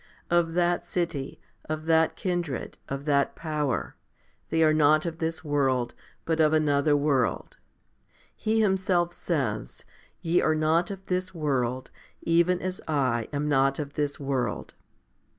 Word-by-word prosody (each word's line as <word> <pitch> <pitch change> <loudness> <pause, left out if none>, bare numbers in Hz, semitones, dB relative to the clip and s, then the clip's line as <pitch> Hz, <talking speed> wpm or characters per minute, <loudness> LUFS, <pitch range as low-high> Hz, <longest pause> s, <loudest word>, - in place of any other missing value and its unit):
Of 170 -1 +2
that 175 0 +2
city, 165 -6 -3 0.3
of 155 0 -4
that 160 0 +3
kindred, 175 -8 -3
of 135 +1 -4
that 140 -2 +2
power, 150 -4 -2 0.5
they 160 0 +2
are 155 -1 +5
not 155 +1 +4
of 165 -1 -4
this 160 0 -2
world, 135 -5 0 0.3
but 165 -1 0
of 155 -1 +4
another 145 -1 +3
world. 140 -4 0 0.8
He 220 +1 +1
Himself 190 -4 +1
says, 130 -11 -3 0.3
Ye 170 +1 +2
are 155 - +2
not 160 +3 +2
of 195 -1 -7
this 185 0 -2
world, 130 -5 -1 0.3
even 170 +2 +3
as 185 0 -4
I 130 -7 0
am 145 0 -2
not 135 -1 +2
of 145 -2 -5
this 145 0 -2
world. 135 -3 -2
155 Hz, 140 wpm, -27 LUFS, 140-170 Hz, 0.8 s, are